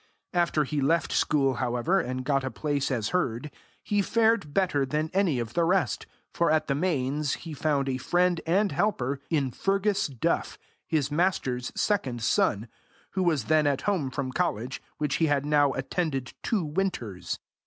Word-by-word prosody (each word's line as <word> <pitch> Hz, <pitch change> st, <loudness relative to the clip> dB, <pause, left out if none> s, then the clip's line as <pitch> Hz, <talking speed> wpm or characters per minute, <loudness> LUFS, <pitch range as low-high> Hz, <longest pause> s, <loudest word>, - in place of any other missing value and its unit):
After 170 Hz, -3 st, +2 dB
he 145 Hz, +1 st, -2 dB
left 165 Hz, +5 st, +2 dB
school, 135 Hz, -3 st, +2 dB
however, 125 Hz, +10 st, +1 dB
and 130 Hz, -2 st, -3 dB
got 135 Hz, -1 st, +1 dB
a 130 Hz, -, -2 dB
place 145 Hz, +3 st, -1 dB
as 115 Hz, -6 st, -1 dB
herd, 145 Hz, -5 st, -1 dB, 0.3 s
he 205 Hz, -1 st, +1 dB
fared 225 Hz, -6 st, +2 dB
better 175 Hz, -5 st, +1 dB
than 150 Hz, +4 st, -1 dB
any 185 Hz, -8 st, +2 dB
of 120 Hz, -1 st, -3 dB
the 170 Hz, -, +2 dB
rest, 180 Hz, +2 st, +1 dB, 0.3 s
for 170 Hz, -, +2 dB
at 155 Hz, 0 st, +2 dB
the 140 Hz, -, 0 dB
Mains 145 Hz, -2 st, 0 dB
he 165 Hz, -, -8 dB
found 145 Hz, -2 st, 0 dB
a 130 Hz, -1 st, 0 dB
friend 175 Hz, +4 st, +2 dB
and 195 Hz, +4 st, +2 dB
helper 140 Hz, -9 st, 0 dB
in 140 Hz, -6 st, +1 dB
Fergus 195 Hz, -, +1 dB
Duff, 130 Hz, -5 st, -1 dB, 0.3 s
his 150 Hz, -3 st, 0 dB
master's 145 Hz, -7 st, 0 dB
second 130 Hz, -, 0 dB
son, 110 Hz, -2 st, +2 dB, 0.4 s
who 190 Hz, -, -1 dB
was 160 Hz, -8 st, +2 dB
then 155 Hz, +3 st, +3 dB
at 140 Hz, -2 st, +1 dB
home 185 Hz, -9 st, 0 dB
from 130 Hz, 0 st, -3 dB
college, 125 Hz, +1 st, -2 dB, 0.2 s
which 150 Hz, -2 st, 0 dB
he 165 Hz, -, +2 dB
had 145 Hz, -1 st, +1 dB
now 145 Hz, -2 st, +3 dB
attended 135 Hz, -1 st, -2 dB
two 205 Hz, -8 st, 0 dB
winters. 145 Hz, -, -2 dB
150 Hz, 170 wpm, -27 LUFS, 130-175 Hz, 0.4 s, then